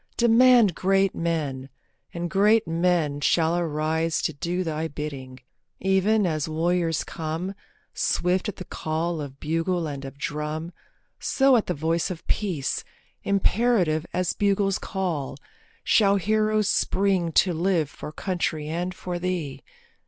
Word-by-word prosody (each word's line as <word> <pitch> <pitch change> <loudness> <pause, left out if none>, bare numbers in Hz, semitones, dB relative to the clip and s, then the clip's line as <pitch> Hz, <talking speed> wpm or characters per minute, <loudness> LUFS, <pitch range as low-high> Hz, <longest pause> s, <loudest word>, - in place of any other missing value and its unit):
Demand 235 -3 +6
great 195 +2 +2
men, 145 -6 -2 0.4
and 175 0 -3
great 210 +5 +3
men 165 -3 +1
shall 160 +3 +2
arise 160 -1 0
To 160 - 0
do 175 +5 -2
thy 160 -1 -2
bidding. 135 -4 -7 0.4
Even 195 +3 +2
as 155 -3 -1
warriors 165 0 0
come, 165 +4 -4 0.4
Swift 180 +4 0
at 205 - -6
the 185 - -8
call 160 +1 -2
of 140 -1 -8
bugle 165 +3 -1
and 140 -3 -5
of 135 +1 -8
drum, 150 +3 -4 0.5
So 270 -1 +3
at 225 - +1
the 180 - -1
voice 165 +3 0
of 180 -3 -7
Peace, 180 -10 -1 0.4
imperative 200 -5 +1
As 180 -1 0
bugle's 200 -1 +1
call, 165 -9 -3 0.5
shall 200 -2 +4
heroes 215 +2 +1
spring 190 -4 +1
to 180 +2 +4
live 170 -2 +1
For 150 - -9
country 165 -3 -2
and 175 +3 -3
for 180 -1 -5
thee. 165 -7 -3
170 Hz, 135 wpm, -25 LUFS, 155-195 Hz, 0.5 s, Demand